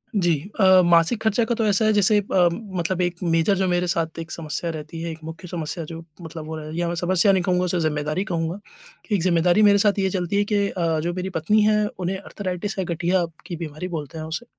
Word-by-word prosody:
जी 175 -4 +3 0.3
अ, 190 -2 +7
मासिक 170 +6 +3
खर्चा 220 +2 +2
का 235 - -1
तो 225 -1 0
ऐसा 205 +2 +2
है 215 - +4
जैसे 210 +1 +4
अ, 190 -3 +2
मतलब 185 -2 -3
एक 175 -1 0
मेजर 165 +3 +2
जो 190 0 +1
मेरे 180 0 +1
साथ 165 -1 -1
एक 165 0 -7
समस्या 165 +1 -3
रहती 155 +1 -7
है, 170 - -3
एक 160 - -9
मुख्य 160 +3 -8
समस्या 165 -1 -4
जो 165 +1 -8 0.2
मतलब 160 -1 -8
वो 160 0 -5
है 155 0 -7
या 175 0 0
मैं 170 - -2
समस्या 185 +3 +3
नहीं 190 -2 +2
कहूँगा 180 -1 +1
उसे 180 0 0
जिम्मेदारी 150 +3 -1
कहूँगा। 170 -1 -3 0.5
एक 200 -4 +2
जिम्मेदारी 175 +2 +3
मेरे 205 -1 +6
साथ 205 0 +2
ये 190 -1 +1
चलती 180 0 -2
है 205 - +3
कि 200 -1 +2
अ, 165 -3 -1
जो 170 +3 -2
मेरी 185 +1 -3
पत्नी 185 +5 +2
हैं 210 0 +3
उन्हें 185 +1 -2
आर्थराइटिस 195 +1 -5
है, 190 - -1
गठिया 175 +1 0 0.2
की 175 - -5
बीमारी 160 +1 -6
बोलते 160 -4 -6
हैं 155 - -5
उसे, 160 +9 -4
175 Hz, 235 wpm, -23 LUFS, 165-195 Hz, 0.5 s, अ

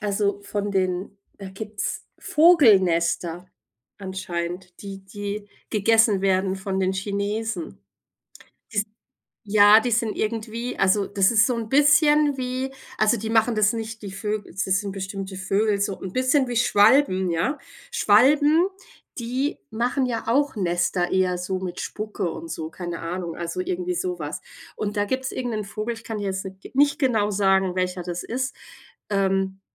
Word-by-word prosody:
also, 200 -1 -1
von 205 0 -3
den 185 +1 -1 0.2
da 195 -2 -7
gibt's 210 +1 -5
Vogelnester 185 - +3 0.5
anscheinend, 180 -2 -5
die 195 -1 -8
die 205 +1 -6 0.2
gegessen 220 -1 +3
werden 190 0 +1
von 190 0 -3
den 190 0 +1
Chinesen. 205 - -3 0.9
Die - - -4
s 205 - +2 0.6
ja, 205 +1 +7
die 245 +2 -1
sind 225 -1 0
irgendwie 230 +2 -3
also, 195 +1 +3
das 195 -1 +2
ist 225 -1 +5
so 250 - 0
'n 225 -1 -4
bisschen 295 +2 +4
wie 255 +1 -3 0.3
also, 215 +2 +3
die 220 0 -4
machen 225 +1 +3
das 215 0 +3
nicht 225 -1 -6
die 200 - -6
Vögel 210 +1 -4
das 190 +2 -2
sind 190 +1 0
bestimmte 195 0 -6
Vögel, 200 +2 0
so 200 -1 -1
'n 190 - -5
bisschen 260 +2 +2
wie 240 - -3
Schwalben, 205 -4 +4
ja. 175 - 0 0.4
Schwalben, 295 - +4 0.5
die 255 - -2
machen 245 +4 0
ja 230 -2 -3
auch 275 +2 +1
Nester 175 -1 0
eher 185 -1 +2
so 185 +1 -3
mit 180 -1 -5
Spucke 215 -4 -4
und 165 - -8
so, 160 0 -4
keine 175 -1 -6
Ahnung, 170 0 -4
also 170 - -4
irgendwie 360 0 -2
so 360 0 -2
was. - - -5 0.4
Und 210 0 -3
da 205 - +2
gibt's 260 +5 -2
irgend 245 -3 -3
'nen 215 -1 -3
Vogel, 215 +3 -4
ich 225 - -12
kann 220 -2 -4
dir 205 - -4
jetzt 190 0 -3
n 190 0 -9 0.2
nicht 285 +2 +3
genau 225 -7 +1
sagen, 190 -2 +2
welcher 180 -1 -1
das 175 0 -4
ist, 255 +1 -3 0.5
ähm, 195 -1 0
205 Hz, 160 wpm, -24 LUFS, 190-235 Hz, 0.9 s, ja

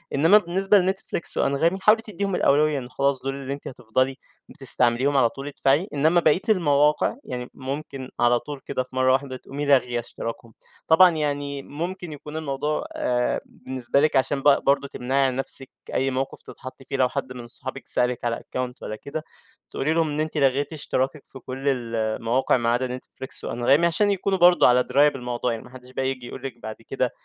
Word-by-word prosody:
إنمّا 165 +9 +6
بالنسبة 195 +2 +3
لNetFlix 190 0 -2 0.2
وAnghami 160 +7 +1
حاولي 215 +2 +5
تدّيهم 200 -3 -3
الأولوية 150 -1 +3
إن 125 -1 -9
خلاص 140 0 0
دُول 135 0 -2
اللي 140 0 -5
أنتِ 140 - -8
هتفضلي 130 +2 -1 0.3
بتستعمليهم 135 -1 +2
على 120 -3 +4
طول 135 +3 -8
ادفعي، 145 +5 +1
إنمّا 160 +5 +3
بقية 160 +3 +3
المواقع 150 -3 +3
يعني، 125 0 -6
مُمكن 135 -1 -6
على 120 0 +4
طول 145 +3 -8
كده 130 - -2
في 130 - -17
مرّة 130 0 +4
واحدة 135 -1 -1
تقومي 145 +3 -6
لاغية 125 -4 +3
اشتراكهم. 115 -1 -7 0.3
طبعًا 180 +3 +7
يعني 145 -3 -2
مُمكن 170 +3 -5
يكون 150 +2 -8
الموضوع 150 0 -2
آآ 125 0 0
بالنسبة 130 0 -2
لِك 155 -1 +2
عشان 135 +1 +1
ب 140 0 +4
برضه 140 0 +3
تمنعي 135 +1 0
عن 130 - -2
نفسِك 135 0 -4 0.2
أي 135 +1 +1
موقف 130 +1 -3
تتحطي 130 +1 -11
فيه، 135 - -3
لو 130 -1 +3
حدّ 130 - -4
من 125 -1 -8
اصحابِك 120 - -8
سألِك 125 -1 0
على 115 -1 +1
Account 125 -1 -4
والّا 110 - -5
كده 140 +7 -6 0.5
تقولي 155 +4 0
لهم 165 -1 +1
إن 145 - -3
أنتِ 155 0 -2
لغيتِ 140 +2 +1
اشتراكِك 135 -1 -2
في 135 - -11
كل 130 +2 -6
المواقع 115 0 0
ما 115 -1 0
عدا 125 +1 0
NetFlix 130 - -8
وAnghami 135 +7 +3
عشان 205 +5 +2
يكونوا 195 0 0
برضه 175 0 +6
على 125 0 +4
دراية 140 +4 +4
بالموضوع 125 -2 -3
يعني، 115 -1 -5
ما - - -14
حدش 130 0 -13
بقى 130 +1 -2
ييجي 130 -2 -4
يقول - - -9
لِك 135 - -4
بعد 110 0 -5
كده 130 -2 -1
135 Hz, 190 wpm, -24 LUFS, 125-150 Hz, 0.5 s, طبعًا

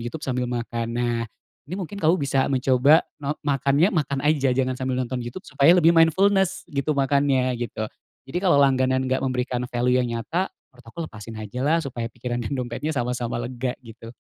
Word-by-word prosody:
YouTube 120 +6 -6
sambil 125 -2 -1
makan. 120 -1 -3
Nah, 120 -1 0 0.5
ini 180 - -4
mungkin 200 +1 -6
kamu 165 +3 +4
bisa 140 -4 0
mencoba 135 +3 +4 0.2
no 145 +1 -2
makannya, 145 +6 +2
makan 140 -4 -1
aja 140 -4 +2
jangan 130 -1 +1
sambil 130 -1 -2
nonton 130 0 -2
YouTube 120 - -7
supaya 145 +5 +4
lebih 170 -1 +5
mindfulness 190 +4 +3
gitu 145 +1 -1
makannya, 135 -2 +2
gitu. 110 -2 -3 0.4
Jadi 140 +6 -3
kalau 180 -7 +3
langganan 130 -1 +3
nggak 130 0 0
memberikan 125 -1 -2
value 125 +1 +1
yang 125 - -1
nyata, 165 - -2 0.2
menurut 125 -2 -20
aku 115 - -16
lepasin 110 -4 -9
aja 110 +3 -6
lah 150 +5 +3
supaya 120 -3 -4
pikiran 120 +1 -4
dan 120 +4 -3
dompetnya 125 +4 -3
sama-sama 120 -1 -2
lega 125 +1 -3
gitu. 115 +1 -11
130 Hz, 180 wpm, -24 LUFS, 120-145 Hz, 0.5 s, lebih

